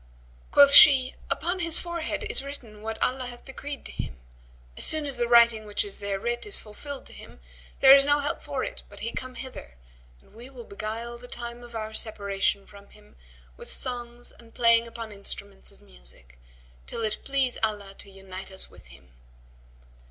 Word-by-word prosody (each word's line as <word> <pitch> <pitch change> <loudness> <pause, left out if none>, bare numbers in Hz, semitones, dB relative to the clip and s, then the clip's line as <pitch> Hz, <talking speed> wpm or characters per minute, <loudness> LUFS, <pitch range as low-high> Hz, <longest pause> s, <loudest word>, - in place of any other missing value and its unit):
Quoth 285 -1 +8
she, 265 -4 +9 0.2
'Upon 355 +2 -1
his 335 -2 +4
forehead 340 -2 -3
is - - +2
written 240 -7 -9
what 220 0 -5
Allah 255 0 -1
hath 240 -1 -11
decreed 280 +1 -7
to - - -7
him; - - -6 0.6
as - - -2
soon 310 -1 +3
as 275 -3 -3
the 240 -1 0
writing 235 -2 +5
which 205 - -1
is 200 - -6
there 200 -1 -3
writ 240 +3 -2
is 410 - +1
fulfilled 270 +6 -9
to - - -13
him, - - -13 0.4
there 270 0 +10
is 275 0 +7
no 290 +1 +3
help 290 +1 -2
for - - -3
it - - -6
but - - -13
he 230 - -3
come 255 +1 -6
hither, 255 - -9 0.4
and - - -24
we 235 +4 -11
will 255 -3 -11
beguile 225 +3 -6
the 245 - -11
time 240 0 -6
of 240 -1 -12
our 220 -1 -5
separation 200 -2 -1
from 200 -1 -16
him 70 +1 -20 0.4
with - - -8
songs 240 -1 -2
and 230 -1 -19
playing 230 -1 +4
upon 230 -1 -8
instruments 200 0 -5
of - - -23
music, - - -14 0.5
till 230 - -4
it 215 -1 -1
please 270 -2 0
Allah 205 -3 -2
to 200 - -7
unite 190 -1 -10
us 190 0 -1
with - - -17
him.' 65 +1 -18
235 Hz, 190 wpm, -26 LUFS, 205-260 Hz, 0.6 s, there